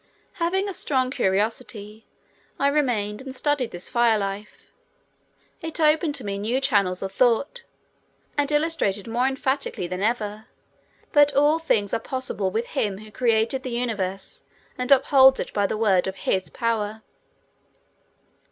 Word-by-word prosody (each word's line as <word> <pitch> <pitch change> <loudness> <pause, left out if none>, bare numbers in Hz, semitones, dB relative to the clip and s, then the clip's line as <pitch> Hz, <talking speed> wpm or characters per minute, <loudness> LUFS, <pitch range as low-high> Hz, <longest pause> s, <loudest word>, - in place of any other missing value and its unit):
Having 380 +4 +1
a 395 - -4
strong 260 -6 0
curiosity, 210 +1 -2 0.5
I 280 - +2
remained 240 -8 0
and 265 -1 -8
studied 285 -3 0
this 175 +1 -6
fire 235 -3 +3
life. 200 +1 -6 0.9
It 325 0 -5
opened 305 -1 +3
to 260 - -5
me 200 -1 -3
new 230 +6 0
channels 200 -10 +1
of 190 - -4
thought 255 - +1 0.7
and 290 0 0
illustrated 295 - 0
more 240 +3 +1
emphatically 270 -7 -2
than 180 +2 -4
ever 215 -1 -2 0.6
that 290 -1 +5
all 295 +3 +4
things 210 -11 0
are - - +1
possible 255 -8 -3
with 225 +5 -3
Him 200 -3 -1
who 215 +1 -12
created 230 +2 +1
the 255 - -5
universe 215 -6 -3 0.3
and 250 +2 -3
upholds 265 -1 +6
it - - -4
by 205 -1 +1
the 215 - -3
word 195 -5 +2
of 190 - -4
His 190 -1 0
power. 220 -2 -2
235 Hz, 145 wpm, -24 LUFS, 205-275 Hz, 0.9 s, upholds